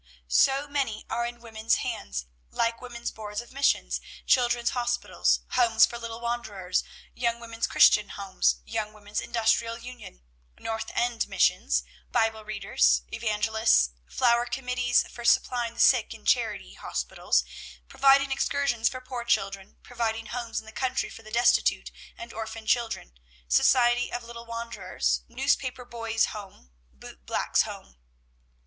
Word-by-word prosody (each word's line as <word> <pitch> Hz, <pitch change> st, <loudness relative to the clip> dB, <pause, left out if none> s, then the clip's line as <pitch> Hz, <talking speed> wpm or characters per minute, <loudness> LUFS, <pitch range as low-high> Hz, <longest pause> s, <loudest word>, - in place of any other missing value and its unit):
"So 270 Hz, -, +3 dB
many 275 Hz, -7 st, -2 dB
are 235 Hz, 0 st, 0 dB
in 240 Hz, 0 st, -9 dB
women's 225 Hz, -1 st, 0 dB
hands; 65 Hz, -2 st, -4 dB, 0.2 s
like 230 Hz, -, -1 dB
women's 240 Hz, -1 st, -5 dB
boards 210 Hz, -1 st, -6 dB
of 240 Hz, -, -9 dB
missions, 275 Hz, +1 st, +1 dB, 0.2 s
children's 240 Hz, -1 st, +3 dB
hospitals, 245 Hz, -1 st, 0 dB
homes 230 Hz, -3 st, +5 dB
for 235 Hz, -, -7 dB
little 230 Hz, -1 st, -6 dB
wanderers, 215 Hz, -6 st, -2 dB, 0.3 s
young 235 Hz, -1 st, -1 dB
women's 230 Hz, -1 st, -3 dB
Christian 210 Hz, -1 st, +5 dB
homes, -, -, 0 dB
young 215 Hz, -, -3 dB
women's 205 Hz, 0 st, -5 dB
industrial 230 Hz, 0 st, +1 dB
union, 245 Hz, -, -11 dB, 0.3 s
North 225 Hz, 0 st, -4 dB
End 240 Hz, -1 st, 0 dB
missions, -, -, +2 dB, 0.3 s
Bible 225 Hz, -2 st, +1 dB
readers, -, -, +2 dB
evangelists, 210 Hz, -, +2 dB, 0.2 s
flower 240 Hz, -1 st, +2 dB
committees 250 Hz, -1 st, +1 dB
for 240 Hz, -, -10 dB
supplying 235 Hz, 0 st, +2 dB
the -, -, -11 dB
sick -, -, +4 dB
in -, -, -16 dB
charity -, -, +1 dB
hospitals, -, -, -1 dB, 0.4 s
providing 275 Hz, 0 st, +4 dB
excursions 270 Hz, -4 st, +1 dB
for 255 Hz, -, -7 dB
poor 255 Hz, -2 st, -6 dB
children, 195 Hz, -4 st, -1 dB
providing 225 Hz, -2 st, -2 dB
homes 235 Hz, 0 st, -4 dB
in -, -, -13 dB
the 220 Hz, -, -11 dB
country 250 Hz, +3 st, -2 dB
for -, -, -11 dB
the 215 Hz, -, -13 dB
destitute 235 Hz, +3 st, +2 dB, 0.3 s
and 350 Hz, -, -9 dB
orphan 220 Hz, 0 st, -6 dB
children, 225 Hz, -, -1 dB, 0.3 s
society 240 Hz, -, +4 dB
of 245 Hz, 0 st, -4 dB
little 235 Hz, 0 st, -10 dB
wanderers, 230 Hz, -, -2 dB
newspaper 255 Hz, -1 st, -1 dB
boys' 230 Hz, -2 st, -1 dB
home, 195 Hz, -, -11 dB, 0.2 s
boot 60 Hz, -1 st, -13 dB
black -, -, -2 dB
boys' -, -, +6 dB
home. 65 Hz, -2 st, -7 dB
230 Hz, 140 wpm, -27 LUFS, 215-240 Hz, 0.4 s, boys